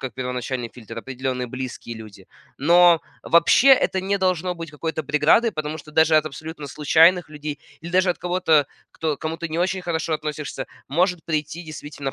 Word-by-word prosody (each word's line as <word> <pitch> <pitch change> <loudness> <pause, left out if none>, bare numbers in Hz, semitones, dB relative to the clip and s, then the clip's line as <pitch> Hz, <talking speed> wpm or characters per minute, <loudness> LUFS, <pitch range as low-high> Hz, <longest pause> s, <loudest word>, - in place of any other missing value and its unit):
как 130 -5 -6
первоначальный 125 -1 -4
фильтр, 115 -2 -11
определенные 130 0 -4
близкие 125 -2 -6
люди. 105 -4 -13 0.3
Но 170 +2 +5 0.2
вообще 170 +11 +5
это 190 -7 +4
не 195 +1 -1
должно 185 -1 0
быть 165 -2 -8
какой-то 160 +1 -4
преградой, 150 - +3
потому 155 -3 -4
что 150 - -12
даже 160 0 +4
от 155 0 +2
абсолютно 155 0 -8
случайных 160 +5 +4
людей, 150 -1 -6 0.2
или 170 +1 -8
даже 185 0 +3
от - - -3
кого-то, 170 -5 +2 0.3
кто, 155 -3 -2
к - - -38
кому 160 +1 -3
ты 170 - -4
не 160 - -3
очень 185 +1 0
хорошо 165 -2 -2
относишься, 150 -3 -5 0.2
может 175 +3 0
прийти 155 +1 -3
действительно 145 -3 -6
155 Hz, 180 wpm, -22 LUFS, 140-170 Hz, 0.3 s, Но